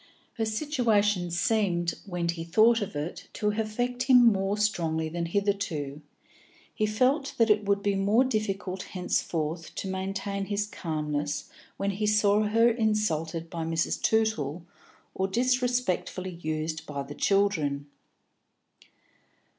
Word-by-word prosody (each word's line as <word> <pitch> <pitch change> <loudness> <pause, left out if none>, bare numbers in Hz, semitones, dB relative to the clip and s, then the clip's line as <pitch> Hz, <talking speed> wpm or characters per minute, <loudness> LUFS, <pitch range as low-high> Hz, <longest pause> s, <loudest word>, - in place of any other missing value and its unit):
Her 225 - 0
situation 215 - +1
seemed, 175 -2 +1
when 175 -2 -2
he 170 -1 -2
thought 220 +7 +4
of 200 - -4
it, 150 +4 -5
to 210 - 0
affect 225 +4 -2
him 250 -2 +8
more 200 -2 +3
strongly 165 -6 0
than 170 +1 -3
hitherto; 170 -7 -1 0.7
he 215 - 0
felt 260 +7 +1
that 230 -2 +4
it 210 0 +2
would 200 0 +1
be 205 - +2
more 200 +5 +3
difficult 200 -6 -2
henceforth 165 -3 -2
to - - -4
maintain 195 +1 -3
his 205 +1 -1
calmness 150 -6 -3 0.3
when 200 0 0
he 210 +2 -1
saw 210 0 +4
her 225 +2 +4
insulted 195 -8 0
by 165 -1 -4
Mrs. 165 0 -1
Tootle 180 -8 0 0.5
or 190 - 0
disrespectfully 245 -5 0
used 155 +1 -3
by 140 -2 -4
the 140 +1 -8
children. 155 -7 +1
195 Hz, 130 wpm, -28 LUFS, 165-215 Hz, 0.7 s, him